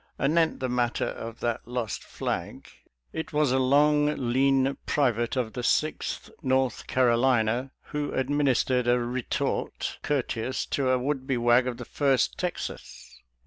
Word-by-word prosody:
Anent 160 Hz, +3 st, +2 dB
the 130 Hz, -, 0 dB
matter 120 Hz, -1 st, 0 dB
of 115 Hz, 0 st, -7 dB
that 120 Hz, -2 st, -2 dB
lost 120 Hz, -4 st, -3 dB
flag. -, -, -4 dB, 0.5 s
It 160 Hz, -, -5 dB
was 150 Hz, -3 st, +2 dB
a 130 Hz, -, +2 dB
long, 150 Hz, +3 st, +3 dB, 0.2 s
lean 135 Hz, +1 st, +3 dB
private 120 Hz, -5 st, +1 dB
of 120 Hz, -4 st, -1 dB
the 125 Hz, -, -4 dB
Sixth 155 Hz, +5 st, -1 dB
North 130 Hz, -1 st, 0 dB
Carolina 125 Hz, 0 st, +2 dB, 0.2 s
who 150 Hz, -1 st, -2 dB
administered 130 Hz, -2 st, +1 dB
a 120 Hz, 0 st, +4 dB
retort 120 Hz, +1 st, -2 dB
courteous 130 Hz, -3 st, -1 dB
to 135 Hz, -2 st, +1 dB
a 130 Hz, -, +4 dB
would 130 Hz, +1 st, -2 dB
be 130 Hz, -3 st, +1 dB
wag 120 Hz, +1 st, +4 dB
of 125 Hz, -2 st, -3 dB
the -, -, -7 dB
First 135 Hz, -3 st, +1 dB
Texas. 175 Hz, -, -6 dB
130 Hz, 145 wpm, -27 LUFS, 120-140 Hz, 0.5 s, a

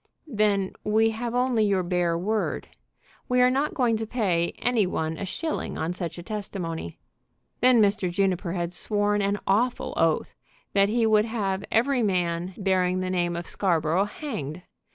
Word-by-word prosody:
"Then 205 Hz, -3 st, +1 dB
we 220 Hz, +1 st, +3 dB
have 235 Hz, +2 st, -4 dB
only 245 Hz, -3 st, +2 dB
your 195 Hz, -3 st, +2 dB
bare 175 Hz, -1 st, 0 dB
word. 215 Hz, +5 st, -2 dB, 0.6 s
We 250 Hz, 0 st, +3 dB
are 250 Hz, 0 st, +5 dB
not 280 Hz, +3 st, 0 dB
going 240 Hz, -4 st, +2 dB
to 220 Hz, 0 st, -4 dB
pay 185 Hz, -8 st, 0 dB
any 235 Hz, -6 st, +1 dB
one 160 Hz, -3 st, -2 dB
a 195 Hz, -, -5 dB
shilling 320 Hz, -, -3 dB
on 165 Hz, +2 st, -2 dB
such 175 Hz, -2 st, -5 dB
a 175 Hz, -, -7 dB
testimony." 180 Hz, -, -5 dB, 0.6 s
Then 250 Hz, 0 st, +5 dB
Mr. 200 Hz, -2 st, +1 dB
Juniper 180 Hz, -1 st, 0 dB
had 175 Hz, -1 st, -2 dB
sworn 205 Hz, +1 st, 0 dB
an 200 Hz, +1 st, +1 dB
awful 235 Hz, +6 st, +1 dB
oath 165 Hz, -1 st, +1 dB, 0.4 s
that 200 Hz, 0 st, +4 dB
he 230 Hz, +1 st, +2 dB
would 215 Hz, -1 st, +4 dB
have 200 Hz, -4 st, -2 dB
every 250 Hz, +3 st, +2 dB
man 180 Hz, -3 st, 0 dB
bearing 185 Hz, -2 st, +1 dB
the 185 Hz, 0 st, -2 dB
name 175 Hz, -2 st, 0 dB
of 170 Hz, 0 st, -4 dB
Scarborough 170 Hz, 0 st, +1 dB
hanged. 180 Hz, -, -6 dB
200 Hz, 165 wpm, -26 LUFS, 175-220 Hz, 0.6 s, are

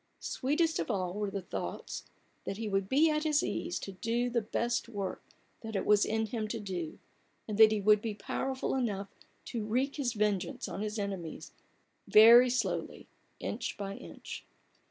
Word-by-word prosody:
Sweetest 315 Hz, +5 st, 0 dB
of -, -, -2 dB
all 185 Hz, -5 st, -1 dB
were 205 Hz, 0 st, -2 dB
the 195 Hz, -1 st, -4 dB
thoughts, -, -, -5 dB, 0.4 s
that 195 Hz, -, -4 dB
he 225 Hz, 0 st, -3 dB
would 195 Hz, -1 st, 0 dB
be 310 Hz, +4 st, +5 dB
at 305 Hz, 0 st, 0 dB
his 305 Hz, -1 st, +2 dB
ease 345 Hz, -, -2 dB
to 195 Hz, -, -6 dB
do 235 Hz, +5 st, -1 dB
the 235 Hz, -1 st, +1 dB
best 235 Hz, +2 st, -1 dB
work 200 Hz, -4 st, -4 dB, 0.4 s
that 220 Hz, -1 st, -6 dB
it 195 Hz, -, 0 dB
was 210 Hz, -1 st, +5 dB
in 220 Hz, +1 st, 0 dB
him 220 Hz, 0 st, -3 dB
to 225 Hz, +1 st, -3 dB
do, 180 Hz, -6 st, -4 dB, 0.5 s
and 215 Hz, -1 st, -4 dB
that 220 Hz, -1 st, +9 dB
he 215 Hz, -, +1 dB
would 210 Hz, +1 st, +5 dB
be 220 Hz, -2 st, -3 dB
powerful 265 Hz, +5 st, -2 dB
enough 205 Hz, -6 st, -1 dB, 0.4 s
to 230 Hz, -3 st, -3 dB
wreak 255 Hz, +7 st, 0 dB
his 255 Hz, -5 st, 0 dB
vengeance 210 Hz, -4 st, -1 dB
on -, -, -5 dB
his 215 Hz, +1 st, -3 dB
enemies 195 Hz, -5 st, -5 dB, 0.6 s
very 235 Hz, +4 st, +9 dB
slowly, 250 Hz, +1 st, -2 dB, 0.3 s
inch -, -, -4 dB
by 200 Hz, -1 st, -4 dB
inch. -, -, -9 dB
215 Hz, 175 wpm, -31 LUFS, 200-245 Hz, 0.6 s, that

